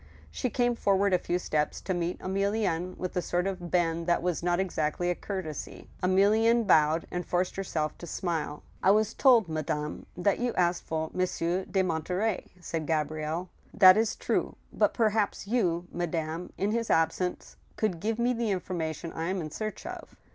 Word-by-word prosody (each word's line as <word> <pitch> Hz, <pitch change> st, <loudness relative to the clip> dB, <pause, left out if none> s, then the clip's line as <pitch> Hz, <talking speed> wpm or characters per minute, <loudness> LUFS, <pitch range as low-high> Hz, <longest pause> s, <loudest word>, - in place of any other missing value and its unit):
She 255 Hz, -, -2 dB
came 245 Hz, +1 st, +1 dB
forward 200 Hz, -3 st, +2 dB
a 180 Hz, -, +4 dB
few 175 Hz, -, -1 dB
steps 150 Hz, -4 st, -1 dB
to 190 Hz, -, -2 dB
meet 175 Hz, 0 st, -2 dB
Emilienne, 190 Hz, -2 st, -1 dB
with 185 Hz, -, -4 dB
a 180 Hz, -, +1 dB
sort 175 Hz, +1 st, -1 dB
of 185 Hz, -3 st, -3 dB
bend 170 Hz, -1 st, +1 dB
that 170 Hz, -1 st, +2 dB
was 180 Hz, -2 st, 0 dB
not 175 Hz, +1 st, +1 dB
exactly 175 Hz, -1 st, 0 dB
a -, -, +2 dB
courtesy. 185 Hz, -7 st, -6 dB
Emilienne 215 Hz, +5 st, +4 dB
bowed, 160 Hz, -3 st, +4 dB
and 180 Hz, 0 st, -2 dB
forced 180 Hz, +1 st, -1 dB
herself 160 Hz, -6 st, -2 dB
to 175 Hz, -, -8 dB
smile. 160 Hz, -3 st, -3 dB, 0.2 s
"I -, -, +4 dB
was 215 Hz, +2 st, +3 dB
told, 240 Hz, -7 st, +5 dB
madame, 150 Hz, -1 st, -3 dB
that 190 Hz, +3 st, +1 dB
you 245 Hz, 0 st, -1 dB
asked 175 Hz, -1 st, +1 dB
for 160 Hz, 0 st, -2 dB
Monsieur 185 Hz, 0 st, -1 dB
de 190 Hz, -1 st, +1 dB
Mon* 165 Hz, -3 st, -1 dB
terey? 190 Hz, +4 st, -1 dB
" -, -, -23 dB
said 165 Hz, -3 st, -4 dB
Gabrielle. 155 Hz, +2 st, -1 dB, 0.3 s
That 185 Hz, -2 st, +9 dB
is 220 Hz, 0 st, +1 dB
true; -, -, -1 dB, 0.2 s
but -, -, +2 dB
perhaps 215 Hz, -3 st, +1 dB
you, 180 Hz, -6 st, +1 dB
madame, 170 Hz, 0 st, -3 dB
in 200 Hz, +2 st, 0 dB
his 230 Hz, 0 st, -1 dB
absence, 165 Hz, +3 st, 0 dB, 0.2 s
could 200 Hz, -6 st, -1 dB
give 220 Hz, +4 st, -1 dB
me 240 Hz, +1 st, +2 dB
the 230 Hz, -2 st, -1 dB
information 170 Hz, -4 st, -3 dB
I 165 Hz, +2 st, -3 dB
am 190 Hz, 0 st, -1 dB
in 155 Hz, -3 st, -5 dB
search 215 Hz, +5 st, -5 dB
of." -, -, -8 dB
180 Hz, 185 wpm, -29 LUFS, 165-200 Hz, 0.3 s, That